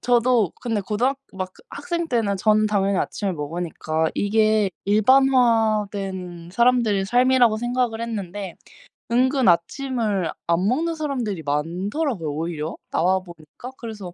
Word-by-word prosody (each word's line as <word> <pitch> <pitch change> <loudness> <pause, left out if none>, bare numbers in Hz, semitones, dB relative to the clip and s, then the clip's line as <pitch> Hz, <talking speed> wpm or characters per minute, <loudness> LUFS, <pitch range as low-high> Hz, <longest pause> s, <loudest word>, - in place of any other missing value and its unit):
저도 240 -5 +2
근데 225 -4 -1
고등학 245 +8 -1
막 185 -1 -5
그 - - -21
학생 340 -1 -3
때는 220 -5 0
전 215 +2 +3
당연히 200 -2 +1
아침을 200 -3 -2
먹으니까 160 0 -2
이게 215 -1 +2
일반화된 210 -6 +2
사람들의 235 -4 +3
삶이라고 245 -1 +4
생각을 240 -1 -1
했는데 205 -5 -5 0.6
은근 260 +1 +2
아침을 200 - +1 0.2
안 170 +3 +2
먹는 325 +7 0
사람들이 250 - -3
많더라고요, 175 - -2
오히려 160 0 -4 0.2
나와 185 +3 +2
보니까. 175 - -12
그래서 210 -6 -8
210 Hz, 305 characters per minute, -23 LUFS, 185-245 Hz, 0.6 s, 삶이라고